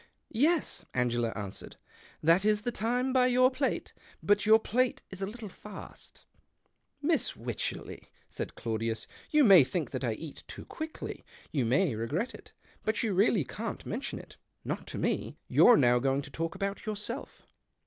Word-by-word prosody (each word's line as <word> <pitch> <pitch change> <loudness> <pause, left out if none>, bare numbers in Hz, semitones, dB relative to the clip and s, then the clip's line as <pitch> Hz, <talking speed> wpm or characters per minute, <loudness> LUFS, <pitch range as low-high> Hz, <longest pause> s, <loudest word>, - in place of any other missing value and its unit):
" - - -51 0.2
Yes," 345 -2 -1
Ano 125 -1 +2
ela 120 -1 +1
answered, 100 -2 -6 0.3
" - - -25
that 165 +4 +5
is 210 0 +2
the 240 - -1
time 245 +3 0
by 255 -1 +5
your 255 +1 +5
plate. 265 +1 -2 0.3
But 205 0 +3
your 220 0 +8
plate's 225 -4 -1
a 195 - -1
little 220 +1 -7
fast." 210 +2 -11 0.8
"Miss 315 -1 +2
Wycherley," 115 -1 -5 0.2
said - - -6
Claudius, 115 0 -2
" - - -23
you 300 -1 +5
may 195 - +9
think 165 +4 -3
that 130 0 -4
I 120 -3 +1
eat 150 +6 -9
too - - -9
quickly. 315 0 -6 0.3
You 135 -6 +1
may 135 +5 +2
regret 145 - -2
it. - - -13 0.3
But 215 0 0
you 220 -3 0
really 195 -1 +3
can't 215 - -6
mention 240 +6 -4
it - - -12 0.2
— - - -43
not - - -4
to - - -4
me. - - -1
You're 240 -2 +7
now 125 -1 +4
going 135 +2 +1
to 145 - -11
talk 165 +5 -3
about 195 +2 -3
yourself." 215 +5 -5
200 Hz, 180 wpm, -30 LUFS, -, 0.8 s, may